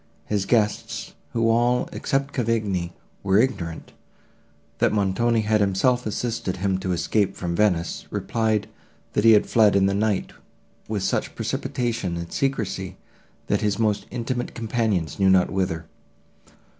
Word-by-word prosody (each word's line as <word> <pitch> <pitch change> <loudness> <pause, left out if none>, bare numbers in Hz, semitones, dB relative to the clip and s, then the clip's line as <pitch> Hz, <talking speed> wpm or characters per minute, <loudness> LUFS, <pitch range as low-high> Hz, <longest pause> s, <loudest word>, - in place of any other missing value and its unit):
His 100 -2 -1
guests, 105 -2 0 0.2
who 115 -1 +1
all, 120 +2 +2
except 140 +1 -1
Cavigni, 105 -8 -1 0.3
were 95 0 +2
ignorant, 95 -9 -1 0.9
that - - +3
Montoni 110 +3 +1
had 105 0 +2
himself 110 +5 +2
assisted 110 -4 -2
him 95 0 0
to 95 -1 -2
escape 90 +4 0
from 85 -2 -3
Venice, 90 -4 0
replied, 110 -2 0 0.5
that 105 - +1
he 115 - +9
had 105 - +5
fled 110 -3 +4
in 95 -1 +4
the 100 - +2
night 105 -1 0 0.6
with 105 -3 -2
such - - -1
precipitation 115 -8 -2
and 85 0 -6
secrecy, 95 -8 -2 0.5
that - - 0
his 105 -2 0
most 105 -2 0
intimate 120 +1 -3
companions 110 - -1
knew 95 -1 +4
not 95 -1 +4
whither. 90 -4 -1
105 Hz, 140 wpm, -24 LUFS, 95-115 Hz, 0.9 s, he